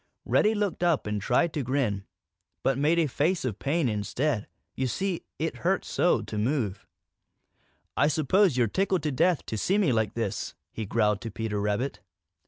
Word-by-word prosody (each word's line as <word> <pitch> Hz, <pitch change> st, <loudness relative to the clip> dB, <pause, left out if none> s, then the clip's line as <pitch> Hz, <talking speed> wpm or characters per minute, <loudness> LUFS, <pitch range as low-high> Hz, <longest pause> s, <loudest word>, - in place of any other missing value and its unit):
Reddy 220 Hz, +1 st, +3 dB
looked 205 Hz, -4 st, -1 dB
up 170 Hz, -4 st, +2 dB
and 105 Hz, -1 st, -2 dB
tried 155 Hz, -, +2 dB
to 150 Hz, -, -1 dB
grin, 120 Hz, -7 st, -1 dB, 0.6 s
but 135 Hz, -, +2 dB
made 150 Hz, +5 st, +2 dB
a 165 Hz, -, +4 dB
face 150 Hz, +4 st, 0 dB
of 110 Hz, -5 st, -3 dB
pain 145 Hz, +1 st, +1 dB
instead. 115 Hz, +3 st, -1 dB, 0.3 s
You 130 Hz, -, 0 dB
see, 190 Hz, +6 st, -2 dB
it 160 Hz, +1 st, -2 dB
hurt 190 Hz, +2 st, 0 dB
so 175 Hz, -, +2 dB
to 105 Hz, -, -6 dB
move. 110 Hz, -5 st, -1 dB, 1.1 s
"I 145 Hz, -, +4 dB
suppose 155 Hz, +2 st, +3 dB
you're 120 Hz, -, +4 dB
tickled 185 Hz, -, 0 dB
to 150 Hz, -, 0 dB
death 170 Hz, +5 st, +2 dB
to 110 Hz, -, -3 dB
see 195 Hz, -, +2 dB
me 190 Hz, -10 st, +3 dB
like 110 Hz, -1 st, 0 dB
this," 115 Hz, -5 st, -3 dB, 0.2 s
he 110 Hz, -2 st, -5 dB
growled 105 Hz, -1 st, +1 dB
to 115 Hz, -, -5 dB
Peter 110 Hz, -1 st, -3 dB
Rabbit. 105 Hz, +6 st, -1 dB
135 Hz, 180 wpm, -27 LUFS, 110-170 Hz, 1.1 s, a